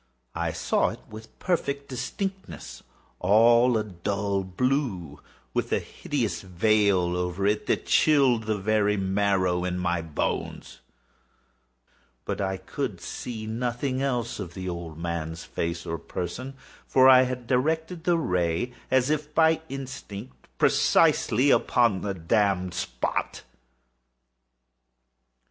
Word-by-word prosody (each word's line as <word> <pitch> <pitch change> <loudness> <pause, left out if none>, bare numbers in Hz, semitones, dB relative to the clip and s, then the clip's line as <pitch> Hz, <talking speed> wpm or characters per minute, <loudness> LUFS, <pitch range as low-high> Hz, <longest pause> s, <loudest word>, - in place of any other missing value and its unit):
I - - -1
saw - - +1
it - - -8
with 110 +1 -11
perfect 140 -6 -1
distinctness—all 120 - 0
a 110 - 0
dull 100 +1 -2
blue, 95 - -1 0.3
with - - -1
a - - +3
hideous 115 -11 -3
veil 95 -1 +2
over 90 +2 -2
it 105 +1 +1
that - - 0
chilled 135 -7 +4
the 110 -1 0
very 105 0 +1
marrow 95 -2 +1
in 90 0 -2
my 90 -1 0
bones; 80 -2 -4 1.5
but - - -3
I 95 -1 -1
could 95 - -4
see 110 -3 -6
nothing 125 +4 -2
else 120 -5 -1
of 90 -4 -6
the 95 0 -5
old 85 -3 -5
man's 85 -1 -4
face 85 0 -4
or 85 0 -3
person: 105 - -5 0.3
for 130 0 +5
I 130 -1 +9
had 125 -1 -2
directed 160 +7 0
the 175 -1 +3
ray 90 - 0 0.2
as 130 +2 +3
if 150 0 -2
by 160 0 +4
instinct, 130 -4 -8
precisely 130 +6 +3
upon 115 -6 +3
the 100 -2 -3
damned 95 0 +1
spot. 60 -9 -3
105 Hz, 120 wpm, -26 LUFS, 90-130 Hz, 1.5 s, I